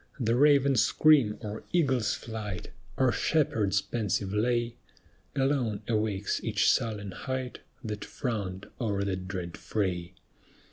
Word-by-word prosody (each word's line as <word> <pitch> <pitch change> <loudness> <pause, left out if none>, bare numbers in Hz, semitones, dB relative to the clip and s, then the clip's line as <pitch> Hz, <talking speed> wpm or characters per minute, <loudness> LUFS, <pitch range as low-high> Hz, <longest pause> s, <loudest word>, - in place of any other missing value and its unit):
The 115 -2 +2
raven's 140 -2 +5
scream 140 -9 +4
or 105 -1 -6
eagle's 135 -11 +2
flight 105 -5 -6 0.3
Or 130 -2 +4
shepherd's 105 - +1
pensive 105 -3 -1
lay, 120 +2 0 0.6
Alone 135 -6 0
awakes 105 -3 0
each 110 -1 +3
sullen 105 -5 -1
height 130 +5 -4 0.2
That 105 -2 -4
frowned 100 -6 -4 0.2
o'er 100 -4 0
that 95 -2 -3
dread 90 -3 -5
fray. 90 -4 -2
110 Hz, 120 wpm, -29 LUFS, 100-125 Hz, 0.6 s, raven's